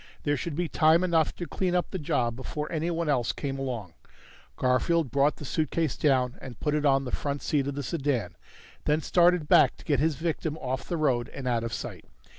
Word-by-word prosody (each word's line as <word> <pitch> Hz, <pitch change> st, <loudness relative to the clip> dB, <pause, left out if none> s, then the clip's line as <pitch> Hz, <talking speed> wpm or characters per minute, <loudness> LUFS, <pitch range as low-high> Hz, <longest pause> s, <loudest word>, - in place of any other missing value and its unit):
There 145 Hz, 0 st, +1 dB
should 145 Hz, +3 st, -4 dB
be 175 Hz, +2 st, -1 dB
time 160 Hz, +3 st, +4 dB
enough 165 Hz, -4 st, +2 dB
to 175 Hz, -, -5 dB
clean 180 Hz, +1 st, -1 dB
up 180 Hz, -, 0 dB
the 190 Hz, -, -3 dB
job 120 Hz, -6 st, 0 dB
before 150 Hz, +5 st, -5 dB
anyone 165 Hz, 0 st, -1 dB
else 125 Hz, -6 st, +1 dB
came 135 Hz, -2 st, -4 dB
along. 120 Hz, -10 st, -4 dB, 0.6 s
Garfield 130 Hz, +3 st, +1 dB
brought 140 Hz, +3 st, +3 dB
the 145 Hz, -, -9 dB
suitcase 155 Hz, +1 st, -1 dB
down 130 Hz, -4 st, +1 dB
and 125 Hz, -4 st, -9 dB
put 150 Hz, -, 0 dB
it 150 Hz, -1 st, +2 dB
on 135 Hz, 0 st, +3 dB
the 125 Hz, -, -5 dB
front 140 Hz, -1 st, -3 dB
seat 140 Hz, -3 st, 0 dB
of 140 Hz, -, -3 dB
the 145 Hz, -, -3 dB
sedan, 140 Hz, -7 st, -1 dB, 0.5 s
then 150 Hz, +2 st, +2 dB
started 175 Hz, -1 st, +3 dB
back -, -, +5 dB
to -, -, -15 dB
get 145 Hz, -4 st, +2 dB
his 155 Hz, +1 st, +2 dB
victim 160 Hz, 0 st, -2 dB
off 130 Hz, -2 st, -4 dB
the 170 Hz, -, -1 dB
road 130 Hz, -6 st, +1 dB
and 135 Hz, -2 st, -6 dB
out 120 Hz, -2 st, +1 dB
of 115 Hz, -, -3 dB
sight. -, -, -6 dB
145 Hz, 215 wpm, -27 LUFS, 130-160 Hz, 0.6 s, back